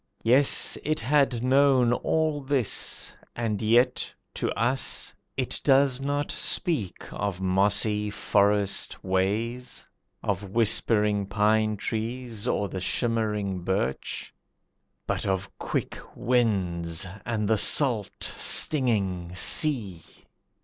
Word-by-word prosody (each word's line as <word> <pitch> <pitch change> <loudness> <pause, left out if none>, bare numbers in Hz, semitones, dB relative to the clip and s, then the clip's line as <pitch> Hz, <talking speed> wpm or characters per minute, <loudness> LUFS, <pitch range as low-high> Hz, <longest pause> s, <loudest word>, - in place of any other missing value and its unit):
Yes, 130 +5 +4
it 155 +1 -1
had 130 -1 +1
known 130 -2 +3
all 155 +2 -1
this, 135 -4 -1 0.2
and 115 -3 -2
yet 115 +3 +2 0.2
to - - -2
us 125 +4 0 0.2
It 130 -2 -2
does 135 -1 +3
not 145 +1 -2
speak 155 - 0 0.2
of 100 -2 -3
mossy 100 +3 +1
forest 100 0 +1
ways, 105 +7 -2 0.4
Of 100 0 -3
whispering 105 -1 +2
pine 105 +1 +1
trees 115 +1 -4
or 100 - 0
the 95 - -6
shimmering 105 -3 -1
birch; 90 -6 -3 0.7
But - - -2
of 95 -1 -3
quick - - -3 0.2
winds, 95 -9 0 0.2
and 110 -3 -2
the 110 -1 +2
salt, 120 -7 +1
stinging 100 - +3
sea! 105 - +1
110 Hz, 100 wpm, -26 LUFS, 100-125 Hz, 0.7 s, Yes